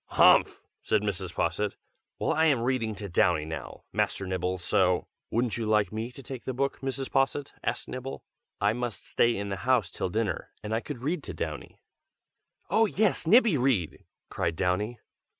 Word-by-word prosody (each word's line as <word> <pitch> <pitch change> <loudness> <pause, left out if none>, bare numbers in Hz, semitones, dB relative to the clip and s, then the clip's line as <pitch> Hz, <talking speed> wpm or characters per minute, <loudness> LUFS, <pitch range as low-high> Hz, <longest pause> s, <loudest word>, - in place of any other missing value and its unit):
"Humph!" - - +5 0.2
said 105 -1 +1
Mrs. 95 -3 -2
Posset. 105 -1 0 0.4
"Well, - - +1
I 160 - +3
am 140 -7 +3
reading 120 -4 0
to 100 0 -5
Downy 85 -3 +2
now, 80 -3 -7
Master 95 - 0
Nibble, 95 0 -1
so 90 0 +2
" - - -61
"Wouldn't 115 -2 0
you 115 -2 -2
like 105 -1 +3
me 110 +3 -3
to 135 - -9
take 130 0 -7
the 130 - -3
book, 140 +2 -1
Mrs. 135 0 -3
Posset?" 135 +1 +1
asked - - -2
Nibble. 130 +1 -6 0.4
"I 105 +1 +3
must 120 -2 -4
stay 120 -2 +2
in 100 0 -3
the 95 - -2
house 120 -2 +2
till - - -2
dinner, 105 -2 -2
and 105 +1 -3
I 110 - +2
could 125 -1 -7
read 165 +6 -1
to - - -6
Downy." - - -6 0.8
"Oh! 225 0 +4
yes, 200 -4 +1
Nibby, 220 - +6
read!" 120 - 0 0.3
cried 85 - -1
Downy. 95 +7 0
115 Hz, 185 wpm, -28 LUFS, 95-130 Hz, 0.8 s, Nibby